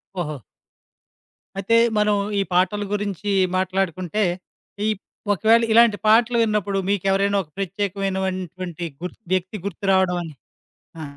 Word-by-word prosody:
ఓహో! 155 -5 -3 1.2
అయితే 200 +4 +1 0.2
మనం 210 0 +3 0.2
ఈ - - +3
పాటల 205 +3 +2
గురించి 205 0 -2 0.3
మాట్లాడుకుంటే, 185 +1 -1 0.7
ఇప్ 210 -2 -5 0.3
ఒకవేళ 225 +4 +4
ఇలాంటి 230 -2 +6
పాటలు 235 +2 +4
విన్నప్పుడు 205 -3 0
మీకేవరైనా 200 +1 +1
ఒక 155 - -24
ప్రత్యేకమైనటువంటి, 190 -3 -3 0.2
గుర్త్ 180 +5 -7
వ్యక్తి 185 +3 -1
గుర్తురావడమని 185 -3 0 0.7
ఆ! - - -5
195 Hz, 100 wpm, -22 LUFS, 185-210 Hz, 1.2 s, ఇలాంటి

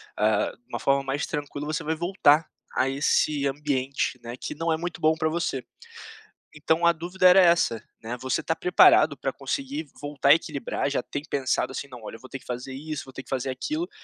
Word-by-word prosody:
ah, 105 0 +2
de 120 +1 -42
uma - - -4
forma 140 0 +2
mais 135 +2 -2
tranquila, 145 -1 -5
você 155 +2 -2
vai 160 +1 0
voltar 165 -3 +3 0.2
a 130 - +2
esse 140 +1 +1
ambiente, 135 -2 -1
né, 120 +1 -6
que - - -6
não 165 +1 -1
é 160 - +2
muito 170 0 -5
bom 155 +1 +4
para 160 0 -1
você. 160 -5 -2 0.9
Então 160 +3 +1
a 170 - +7
dúvida 180 +3 +1
era 180 +1 +8
essa, 170 -10 +3 0.2
né, 115 +2 -4
você 130 0 -1
está 160 - -1
preparado 180 - +5
para - - -2
conseguir 280 +3 -4
voltar 145 -1 -1
a 145 - +11
equilibrar, 150 -4 -3
já 140 - 0
tem 145 - -5
pensado 130 -1 0
assim: 140 - -5
"Não, 125 -3 -11
olha, 110 - -7
eu - - -12
vou 130 - -13
ter 135 - -5
que - - -20
fazer 125 +2 -5
isso, 150 +2 -5
vou 130 - -13
ter 130 - -7
que - - -20
fazer 135 0 -2
aquilo", 305 - -3
145 Hz, 220 wpm, -26 LUFS, 130-165 Hz, 0.9 s, a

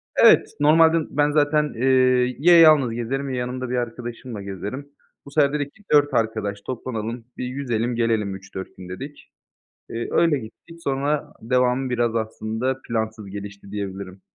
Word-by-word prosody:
Evet, - - +6
normalde 160 +2 +5
ben 145 +1 +1
zaten, 150 0 +2
eee, 130 0 +3
ya 170 +2 +7
yalnız 155 -7 +6
gezerim 135 +4 -3
ya 130 - -3
yanımda 125 0 -3
bir 125 - -1
arkadaşımla 120 -1 -5
gezerim. 100 +9 -6 0.4
Bu 140 - -12
sefer 145 -1 +3
dedik 145 -1 -2
ki 215 - -21
4 145 -1 +4
arkadaş 110 -3 -1
toplanalım, 115 -1 -5
bir - - -3
yüzelim 125 -2 -2
gelelim 110 -4 0
3-4 95 0 -9
gün 90 -1 -10
dedik. 135 +11 -9 0.6
Eee, 115 +1 -4
öyle 165 -4 +3
gittik, 165 +9 -13
sonra 140 +2 -1
devamı 125 +2 +1
biraz 120 -2 0
aslında 110 +3 -2
plansız 110 -2 -3
gelişti 100 0 -9
diyebilirim. 100 -2 -6
125 Hz, 150 wpm, -23 LUFS, 110-140 Hz, 0.6 s, ya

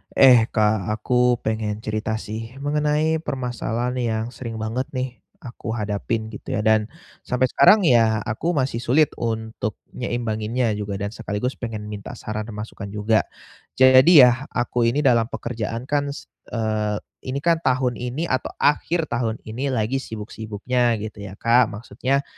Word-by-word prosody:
Eh 125 -4 +7
Kak, 105 -3 +1
aku 125 +3 +2
pengen 110 -1 -2
cerita 110 0 -2
sih, 115 +2 -6
mengenai 150 +2 +1
permasalahan 125 -3 -3
yang 110 -2 -1
sering 120 -3 -7
banget 110 +4 -3
nih, 130 -1 -3 0.2
aku 115 -2 -5
hadapin, 110 +1 -2
gitu 105 - -5
ya, 105 - -1
dan, 110 -1 +3 0.4
sampai 125 0 +1
sekarang, 200 +4 +6
ya, 115 - +4
aku 140 +10 -2
masih 130 -4 0
sulit 135 +5 +3
untuk 110 -2 -3 0.2
nyeimbanginnya 120 -1 -1
juga, 100 -1 -3
dan 100 +1 -3
sekaligus 115 +2 -4
pengen 110 -3 -5
minta 105 +3 -7
saran, 110 -1 -5
masukan 105 -1 -7
juga. 105 +2 +1 0.5
Jadi 130 +4 +8
ya, 125 +3 +3
aku 120 -1 0
ini 140 +6 +1
dalam 120 -5 +4
pekerjaan 115 0 -4
kan 145 0 0
se - - -11 0.3
eee, 110 -2 0 0.3
ini 130 +2 -2
kan 170 -1 +3
tahun 130 -4 +1
ini 125 +6 -3
atau 130 - -1
akhir 160 +3 +1
tahun 115 -2 -1
ini, 120 +6 -4
lagi 115 +4 0
sibuk-sibuknya, 110 +1 -2
gitu 110 -1 -7
ya 100 -1 -8
Kak. 120 +2 +4
Maksudnya, 130 +6 -2
115 Hz, 150 wpm, -23 LUFS, 110-130 Hz, 0.5 s, Jadi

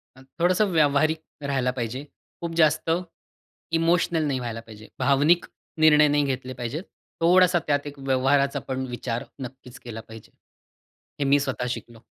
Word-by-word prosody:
अ, 130 - -16 0.2
थोडंसं 185 +4 +3
व्यावहारिक 155 0 +3 0.2
राहायला 135 -3 0
पाहिजे. 125 +1 -4 0.4
खूप 170 -1 -4
जास्त 160 0 +3 0.9
इमोशनल 165 -1 +2
नाही 135 -2 -1
व्हायला 115 -2 -4
पाहिजे. 110 -1 -13
भावनिक 145 +5 +3 0.3
निर्णय 150 -1 +6
नाही 145 0 +2
घेतले 130 -1 -3
पाहिजेत. 125 +6 -4 0.4
थोडासा 180 +1 +5
त्यात 145 0 +1
एक 145 -1 -9
व्यवहाराचा 135 +1 +2
पण 130 0 -2
विचार 120 0 -3 0.2
नक्कीच 130 -1 -9
केला 115 -2 -8
पाहिजे. 110 -1 -12 0.9
हे 145 - 0
मी 140 +1 +4
स्वतः 130 -3 -2
शिकलो. 120 -2 -7
140 Hz, 145 wpm, -25 LUFS, 125-155 Hz, 0.9 s, निर्णय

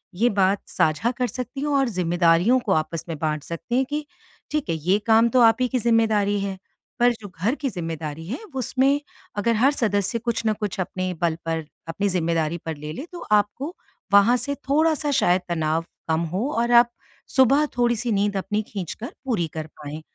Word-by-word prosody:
ये 230 +7 +3
बात 195 -1 +2
साझा 160 +10 +1
कर 250 -1 +1
सकती 250 +2 -6
हैं 295 - -1
और 275 -3 +2
ज़िम्मेदारियों 175 +4 +3
को 230 -5 -3
आपस 155 0 -1
में 165 - -3
बाँट 155 -2 -1
सकती 170 - -4
हैं 265 +1 +3
कि 295 +1 -2 0.5
ठीक 300 - -1
है 165 - +1
ये 175 +6 +2
काम 225 +1 +5
तो 250 +2 +3
आप 225 -1 +6
ही 250 - +3
की 255 +1 -1
ज़िम्मेदारी 220 -3 +2
है। 195 -1 -3 0.4
पर 245 0 +5
जो 205 - -7
घर 230 +8 +2
की 280 -2 -2
ज़िम्मेदारी 160 -5 -5
है 250 - -4 0.2
उसमें 265 +2 +2 0.4
अगर 230 +3 +2
हर 255 +6 +4
सदस्य 205 -3 0
कुछ 235 0 -2
ना 215 - +3
कुछ 205 -3 -4
अपने 185 0 -3
बल 170 -2 +2
पर 165 -1 -2 0.2
अपनी 200 +5 -1
ज़िम्मेदारी 165 -2 0
पर 160 -1 -3
ले 150 +1 -6
ले 275 - -6
तो 350 - -8
आपको 210 - +1 0.4
वहाँ 220 +5 +6
से 285 +3 -2
थोड़ा-सा 305 0 +2
शायद 180 +1 +3
तनाव 160 -1 0 0.2
कम 160 +1 +2
हो 220 +9 0
और 235 +1 +1
आप 240 0 +7 0.5
सुबह 275 +3 +5
थोड़ी-सी 240 -1 +1
नींद 205 0 +1
अपनी 210 +2 -1
खींचकर 205 +4 -6
पूरी 215 -11 0
कर 155 -1 -5
पाएँ। 150 +1 -7
210 Hz, 195 wpm, -23 LUFS, 170-245 Hz, 0.5 s, आप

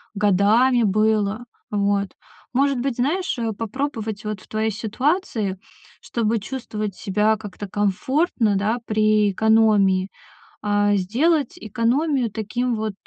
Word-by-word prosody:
годами 210 +5 +3
было. 215 +1 +1 0.3
Вот. 200 -1 +1 0.4
Может 275 0 +2
быть, 260 -1 -2
знаешь, 295 +3 -1
э, 225 -1 -1
попробовать, 225 -2 -4
вот, 210 -3 -4
в - - -18
твоей 220 +1 -1
ситуации, 220 - -1 0.4
чтобы 230 -1 -1
чувствовать 215 -3 -5
себя 210 +2 +1
как-то 205 -1 -8
комфортно, 210 - 0
да, 210 +4 0
при 215 -1 +2
экономии. 205 -3 +3 0.5
А, 205 0 +2
сделать 260 - +1
экономию 245 +3 0
таким 235 +4 -2
вот 215 -1 -3
215 Hz, 115 wpm, -22 LUFS, 205-245 Hz, 0.5 s, годами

